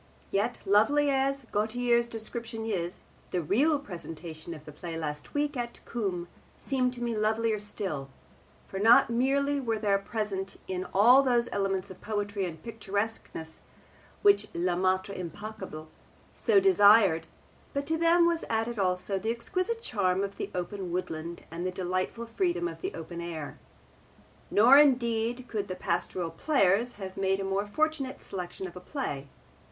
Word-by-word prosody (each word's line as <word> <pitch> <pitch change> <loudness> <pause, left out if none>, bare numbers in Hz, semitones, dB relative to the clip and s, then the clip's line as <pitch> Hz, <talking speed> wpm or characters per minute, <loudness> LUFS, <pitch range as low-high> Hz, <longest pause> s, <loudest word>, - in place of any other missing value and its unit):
Yet, 210 +5 0
lovely 280 +9 +4
as 275 0 +1
Gautier's 235 +3 +2
description 225 0 -5
is, 180 -5 -3 0.3
the 180 -2 -1
real 280 - +3
presentation 170 - -7
of 155 -1 -13
the 150 - -9
play 165 +2 -6
last 150 - -5
week 290 0 0
at 240 -1 -4
Coombe 190 -7 -2 0.3
seemed 255 -2 0
to 240 -1 -6
me 235 -1 -1
lovelier 215 0 +1
still, 190 -9 -4 0.6
for 195 - -5
not 230 +2 +6
merely 280 +4 +2
were 230 -4 -1
there 205 -2 +2
present 195 -2 -4
in 185 0 -3
it - - -10
all 240 +7 +7
those 245 -3 +2
elements 195 -1 -1
of 185 - -12
poetry 205 -2 -2
and 165 -3 -7
picturesqueness 205 -6 -4 0.6
which 405 0 +5
le 175 +1 +1
maitre 185 +2 +1
impeccable 185 -3 -7 0.5
so 430 -4 +4
desired, 205 - +6 0.4
but 280 0 -2
to 320 +2 0
them 335 +1 +4
was 340 -1 +1
added 225 0 -1
also 185 +1 0
the 220 +4 -2
exquisite 370 - -2
charm 190 - +1
of 200 0 -5
the - - -4
open 180 0 -4
woodland 170 -1 -4
and 170 +1 -4
the 185 - 0
delightful 185 +5 -2
freedom 350 +8 0
of - - -8
the 380 - -2
open 170 +1 -6
air. 165 -3 -6 0.9
Nor 245 +7 +7
indeed 245 -3 +2
could 205 -3 -3
the 185 - -4
Pastoral 175 -1 -2
Players 230 - +2
have 190 -2 -8
made 195 0 +1
a - - -2
more 195 +1 -1
fortunate 285 +2 -1
selection 180 0 -5
of 185 - -8
a - - -6
play. 145 - -4
210 Hz, 155 wpm, -29 LUFS, 185-245 Hz, 0.9 s, all